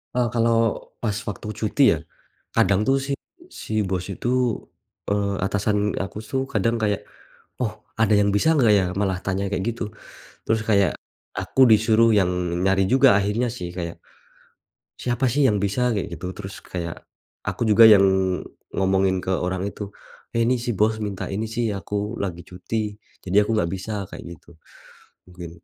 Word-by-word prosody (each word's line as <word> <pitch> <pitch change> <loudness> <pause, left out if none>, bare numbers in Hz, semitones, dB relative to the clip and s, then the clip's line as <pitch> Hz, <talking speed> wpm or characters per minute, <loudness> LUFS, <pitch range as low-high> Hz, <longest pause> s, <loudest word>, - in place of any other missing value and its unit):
E - - +2
kalau, 115 -1 +3 0.4
pas 110 -3 0 0.2
waktu 105 +1 -7
cuti, 110 +6 +1
ya, 80 - -3 0.6
kadang 100 0 +3
tuh 135 0 +4
si 140 - -2 0.5
si 110 -1 -1
Bos 95 -1 -2
itu, 100 +4 -4 0.8
eee, 100 0 0
atasan 105 +1 0
aku 95 - -7
tuh, 130 +4 -1
kadang 115 +2 +1
kayak, 105 -2 0 0.5
"Oh, 110 -4 -3 0.2
ada 110 -1 +3
yang 100 0 +4
bisa 160 +10 +3
enggak 120 -9 +4
ya?" 95 - +2
malah 95 -1 0
tanya 100 0 -1
kayak 95 -2 -2
gitu. 110 -2 -5 0.6
Terus 110 0 +1
kayak, 100 -6 +4 0.5
aku 135 - 0
disuruh 110 +1 +5
yang 95 -2 +3 0.4
nyari 95 0 +2
juga 135 0 +6
akhirnya 105 +5 0
sih, 90 -7 -6
kayak, 85 -1 -5 1.0
"Siapa 120 +1 -1
sih 140 0 +4
yang 105 - +2
bisa?" 115 +4 +1
kayak 95 - -3
gitu. 85 +2 -6
Terus 100 -1 -8
kayak, 85 -2 -5 0.5
aku - - -3
juga 115 +2 +8
yang 100 -3 +7 0.7
ngomongin 95 0 +2
ke 95 - -1
orang 95 +1 -1
itu, 105 - -6 0.5
"Eh, 115 - +3
ini, 125 +1 +1
si 120 -2 -2
Bos 110 +2 +2
minta 100 -3 -4
ini 110 +3 -2
sih, 115 -1 -1
aku 105 +3 -4
lagi 85 -3 -4
cuti, 105 +4 -4 0.3
jadi 95 +1 -1
aku 115 - +1
nggak 85 -6 +1
bisa." 95 +3 -5 0.2
kayak - - -8
gitu, - - -30 0.8
mungkin. 90 -1 -8
105 Hz, 165 wpm, -23 LUFS, 95-115 Hz, 1.0 s, juga